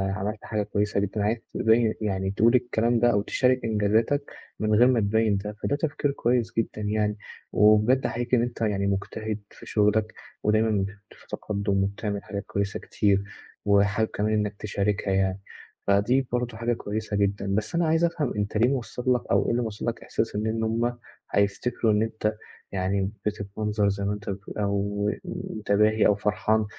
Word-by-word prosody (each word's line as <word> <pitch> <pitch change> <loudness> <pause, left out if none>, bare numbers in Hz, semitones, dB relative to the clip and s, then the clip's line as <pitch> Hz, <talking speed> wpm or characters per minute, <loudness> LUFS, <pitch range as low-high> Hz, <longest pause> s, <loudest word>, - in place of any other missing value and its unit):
عملت 105 +2 -4
حاجة 105 -2 -1
كويّسة 100 0 0
جدًا، 100 +1 -1
عايز 110 +3 +1 0.2
تبيّن 110 0 +3
يعني 95 -2 -1
تقول 115 +4 +4
الكلام 120 -1 +2
ده 120 0 +4
أو 100 -3 +2
تشارك 125 +4 +2
إنجازاتك، 110 +6 +1 0.3
من 110 0 +1
غير 120 +4 +6
ما 125 -3 +3
تبيّن 110 0 +2
ده 105 +1 -5
فده 140 - +1
تفكير 145 -1 -1
كويّس 120 -3 0
جدًا 110 -1 -1
يعني، 105 0 0 0.3
وبجد 110 +5 +4
أحييك 120 +1 -3
إن 120 - +5
أنت 120 -1 -3
يعني 100 -3 +1
مجتهد 105 +2 -2
في - - -14
شُغلك، 105 +1 +2 0.3
ودايمًا 110 -2 +2 0.2
ت - - -16
في - - -20
تقدّم 100 -2 -1
وبتعمل 100 +1 -3
حاجات 100 -1 -5
كويّسة 100 0 -2
كتير، 100 -1 +1 0.4
وحابب 100 +2 +3
كمان 105 +1 0
إنك 105 -1 0
تشاركها 100 -1 -1
يعني، 95 0 +1 0.5
فدي 120 +7 +3
برضه 120 -2 -2
حاجة 120 +1 0
كويّسة 105 -1 -3
جدًا، 100 -1 0
بس 110 +9 -2
أنا 170 -1 +2
عايز 160 +1 +2
أفهم 165 -6 0
أنت 105 +1 -1
ليه 120 +3 +4
موصّل 125 -1 0
لك 125 - 0
أو - - +3
إيه - - +1
اللي 120 - +1
موصّل 110 -3 -4
لك 115 -1 -2
إحساس 110 - -2
إن 105 +1 -1
إن 110 0 -1
هُم، 120 +2 0 0.3
هيفتكروا 105 +3 +1
إن 105 - +3
أنت 110 -1 -1 0.4
يعني 95 +1 0
بتتمنظر 105 0 -1
زي 100 0 -2
ما 100 - 0
أنت 105 0 -6
بتقول 95 +1 -6
أو 100 0 0 0.2
متباهي 110 +1 +1
أو 105 - +4
فرحان 105 +1 +1
105 Hz, 175 wpm, -26 LUFS, 100-115 Hz, 0.5 s, غير